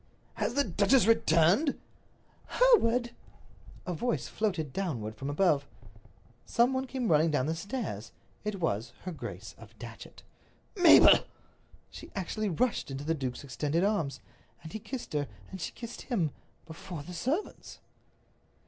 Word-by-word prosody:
"Has 240 - -2
the 285 - +4
duchess 205 +4 +3
returned?" 200 - +4 0.7
"Hereward!" 250 - +4 0.7
A 180 - -2
voice 240 +9 -1
floated 180 -10 -2
downward 125 - -3
from 135 +6 -5
above. 145 -2 +2 0.8
Some 240 +3 +2
one 260 0 -1
came 250 -6 -1
running 155 +2 +4
down 145 -4 +1
the 160 - 0
stairs. 170 - -5 0.3
It 210 -2 -3
was 120 - -1
her 185 - -4
Grace 160 - -7
of - - -15
Datchet. - - -11 0.5
"Mabel!" 355 -4 +8 0.7
She - - -10
actually 205 +3 -2
rushed 235 - 0
into 135 +1 -5
the 165 +2 0
duke's 130 -5 -4
extended 145 +6 -1
arms. 200 -9 0 0.4
And 160 - -9
he 220 - -4
kissed 255 - -7
her, 145 -1 0 0.2
and 190 - -7
she - - -3
kissed 235 -1 -8
him—before 165 - -5
the 180 - -9
servants. 265 - -3
180 Hz, 140 wpm, -30 LUFS, 150-235 Hz, 0.8 s, Mabel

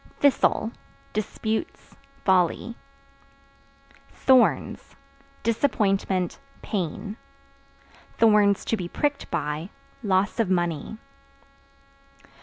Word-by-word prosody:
Thistle 260 -5 +3 0.4
Disputes, 220 - -3 0.3
folly. 190 +5 +2 1.3
Thorns 260 -2 +2 0.5
Disappointment, 195 -6 +1 0.2
pain; 205 +2 -3 1.0
(to 210 -1 +4
be 180 -3 -4
pricked 290 +9 -2
by) 150 +5 -2 0.3
loss 200 0 +1
of 220 -5 +2
money. 175 +2 -1
205 Hz, 65 wpm, -25 LUFS, 185-230 Hz, 1.3 s, to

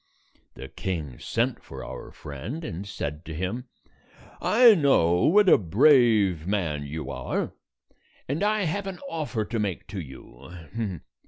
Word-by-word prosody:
The 65 - -8
king 75 -7 -5
sent - - -1
for 65 -1 -9
our - - -8
friend, 95 - -7
and 100 - -6
said 75 -4 -5
to 80 0 -6
him, 95 +9 -3 0.8
"I 235 +1 +7
know 110 - +3
what 205 +4 +5
a - - +7
brave 105 - +4
man 80 -8 -1
you 75 0 -5
are, 65 -2 -3 0.8
and 140 +6 -2
I 210 0 +2
have 195 +4 -2
132 - - -1
an 185 - -8 0.2
offer 130 -9 -2
to 115 +1 -3
make 100 -5 -2
to 100 0 -5
you. 80 - -8
95 Hz, 150 wpm, -26 LUFS, -, 0.8 s, I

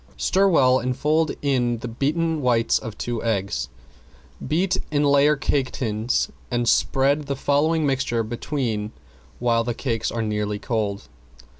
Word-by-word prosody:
Stir 195 +2 +2
well 130 -8 +4
and 130 0 -2
fold 155 +3 +2
in 125 -4 +1
the 120 - -6
beaten 155 +6 -1
whites 120 -3 +2
of 110 -2 -8
two 120 -2 -3
eggs. 100 - -1 0.8
Beat 180 +6 +1
in 150 -1 +1
layer 145 +1 +4
cake 140 -1 0
tins 110 0 -1 0.2
and 120 -1 -1
spread 140 +4 +2
the 140 - -1
following 150 +4 +1
mixture 130 -4 0
between 115 -2 -3 0.4
when 115 -1 +1
the 120 0 -3
cakes 115 -4 -2
are 115 -1 -2
nearly 105 -1 -2
cold. 105 - -3
125 Hz, 145 wpm, -23 LUFS, 115-145 Hz, 0.8 s, well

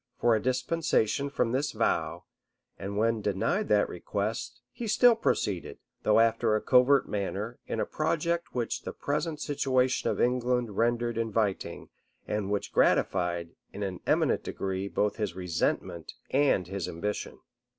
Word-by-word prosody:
for 120 -1 +3
a 110 - 0
dispensation 130 -1 +1
from 125 -4 0
this 135 +2 0
vow; - - 0 0.6
and 100 +1 -4
when 115 0 +2
denied 110 - 0
that 105 -1 +3
request, 105 +7 -3
he 235 - -6
still 240 +3 +6
proceeded, 100 - -1 0.2
though 110 - +4
after 115 -1 +3
a - - +2
covert 130 +4 +4
manner, 105 +3 -3
in - - -3
a - - +1
project 170 0 -1
which 120 -2 -1
the - - -6
present 150 +2 -2
situation 130 -4 +1
of - - -2
England 125 -3 +1
rendered 120 0 +1
inviting, 110 -3 -1 0.4
and 105 -2 -2
which 105 -1 -2
gratified, 85 -2 +2 0.2
in 100 - -4
an 95 -2 -4
eminent - - +2
degree, 95 0 -3
both 105 +1 0
his 105 -6 -2
resentment 85 -2 -2 0.2
and 135 -9 +3
his 95 0 -4
ambition. 105 +6 -4
115 Hz, 145 wpm, -29 LUFS, 100-130 Hz, 0.6 s, still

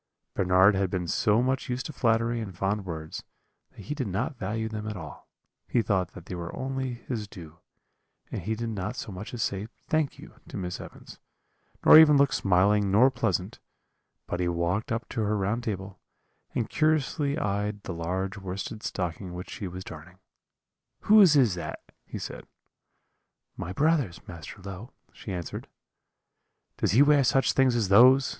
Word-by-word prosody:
"Bernard 95 +2 +4
had 95 -1 0
been 90 -2 -2
so 105 +7 +2
much 130 0 -1
used 125 +1 -2
to 155 - -6
flattery 115 -1 +1
and 95 -5 -7
fond 100 +1 -1
words, 80 -2 -6 0.5
that - - -14
he 125 - -4
did 135 -6 -3
not 110 - -2
value 110 0 -3
them 110 -1 -5
at 105 -2 -4
all; 80 -4 -10 0.4
he 120 - +1
thought 95 -4 0
that 90 - -11
they - - -7
were 85 -1 -5
only 130 -1 -3
his 120 -3 -5
due; 85 -4 -12 0.7
and - - -4
he 110 +6 -2
did 115 +1 -4
not 105 +2 -4
so 110 - -6
much 95 +3 -7
as 120 -3 -2
say 100 +2 -2 0.2
'Thank 155 -3 0
you' - - -13
to - - -7
Miss 90 -2 -4
Evans, - - -12 0.7
nor 155 - +11
even 150 -2 +7
look 140 +1 +3
smiling 100 +2 +3
nor 120 +7 +5
pleasant; 110 -7 -2 0.7
but 90 - -4
he 90 - 0
walked 85 +6 -1
up 115 0 -2
to 115 - -2
her 105 0 0
round 105 +5 -1
table, 95 -2 -5 0.6
and 115 - 0
curiously 150 -2 +1
eyed 105 +1 -2
the 90 - -5
large 95 +4 -3
worsted 95 +3 -5
stocking 90 -1 -4
which 90 +1 -7
she 100 - -5
was 90 +1 -7
darning 85 +4 -11 0.8
'Whose 205 -7 +7
is 125 -8 +4
that?' 90 - -7 0.2
he - - -6
said. - - -7 1.1
"'My 85 - -5
brother's, 140 - 0
Master 90 +3 -10
Low,' 100 +5 -8 0.2
she 100 - -8
answered. 90 -3 -5 1.1
"'Does - - +1
he 130 +6 +7
wear 145 -1 +5
such 135 +2 +3
things 130 -2 +3
as 110 -5 0
those?' 130 +6 +7
105 Hz, 175 wpm, -27 LUFS, 95-125 Hz, 1.1 s, nor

